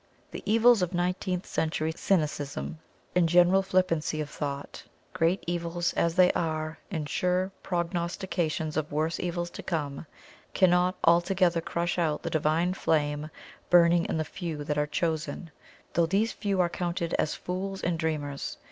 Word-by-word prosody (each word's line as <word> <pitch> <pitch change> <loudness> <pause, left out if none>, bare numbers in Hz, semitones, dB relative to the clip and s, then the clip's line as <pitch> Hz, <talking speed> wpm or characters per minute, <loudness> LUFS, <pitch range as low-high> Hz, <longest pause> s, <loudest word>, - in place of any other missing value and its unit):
The - - -6
evils 230 -1 +6
of 180 0 -1
nineteenth 180 +1 -1
century 160 0 -1
cynicism 145 - -1 0.4
and 175 -2 +4
general 175 +3 +5
flippancy 185 -5 0
of 150 -1 -4
thought 140 -1 -5 0.3
great 180 +1 +1
evils 175 0 -1
as 170 0 +1
they 185 -1 +6
are 155 -1 -2
and 160 -6 -3
sure 180 +3 0
prognostications 170 -2 -2
of 155 -1 -2
worse 155 +3 -1
evils 175 -1 -2
to - - -7
come 150 -3 -3 0.5
cannot 180 -1 +4
altogether 175 0 +3
crush 170 +2 -2
out 155 -3 0
the - - -3
Divine 160 +3 +1
flame 150 -4 0 0.4
burning 170 -1 +5
in - - -1
the 155 - -1
"few" 160 -2 -5
that 150 0 -2
are 150 - +1
"chosen," 160 +2 -2 0.4
though 170 -1 +3
these 210 +5 +1
few 200 -3 -2
are 175 - +3
counted 170 -1 -3
as 150 - +1
fools 190 +2 -4
and 170 -2 0
dreamers. 150 -3 -3
170 Hz, 150 wpm, -28 LUFS, 155-180 Hz, 0.5 s, evils